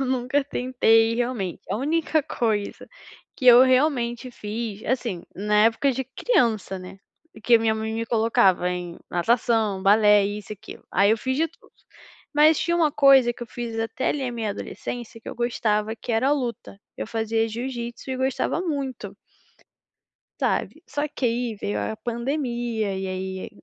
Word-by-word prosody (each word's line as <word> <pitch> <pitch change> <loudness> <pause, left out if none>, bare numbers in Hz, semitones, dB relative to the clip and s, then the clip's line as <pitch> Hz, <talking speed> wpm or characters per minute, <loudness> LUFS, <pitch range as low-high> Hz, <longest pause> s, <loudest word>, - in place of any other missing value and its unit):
eu 270 - 0
nunca 260 +2 0
tentei 240 -4 +2
realmente. 235 -7 -2
A - - 0
única 315 +4 +1
coisa 220 -7 -2 0.5
que 255 - -3
eu 245 0 +10
realmente 255 -2 +1
fiz, 215 -2 -5
assim, 235 -8 -2
na 210 +2 +2
época 250 +5 +1
de 265 +1 -3
criança, 235 - 0
né, 185 +1 -11 0.5
que 235 -1 +6
minha 225 -1 +1
mãe 220 0 -3
me 225 +1 -3
colocava 220 -6 +3
em 180 -1 -5
natação, 220 0 +1
balé 210 0 +5
e 205 +1 -4
isso 210 - -9
aquilo, 195 - -12
aí 200 +2 +4
eu 225 - +2
fiz 260 +3 -2
de 325 +3 +1
tudo. 330 - -25 0.6
Mas 300 +1 +5
tinha 340 +3 0
uma 315 -4 +2
coisa 270 -4 +6
que 240 - -10
eu - - -6
fiz 235 -2 -5
até 225 +3 -2
ali 290 - -1
a 250 - -3
minha 225 -3 -2
adolescência 235 +3 -7
que - - -10
eu - - -6
gostava 220 -2 -1
que 240 - -5
era 225 +4 +2
a - - +4
luta, 240 -7 -4 0.2
eu - - -4
fazia 225 0 0
jiujitsu 240 +2 -5
e 260 - -2
gostava 265 +5 -1
muito. 280 -8 -4 1.3
Sabe, 315 - -1
só 290 +1 -2
que 280 -3 -3
aí 235 -1 -1
veio 105 - -3
a 105 +2 -3
pandemia 235 -4 -2
e 190 0 -3
aí 190 0 -5
235 Hz, 170 wpm, -24 LUFS, 210-260 Hz, 1.3 s, eu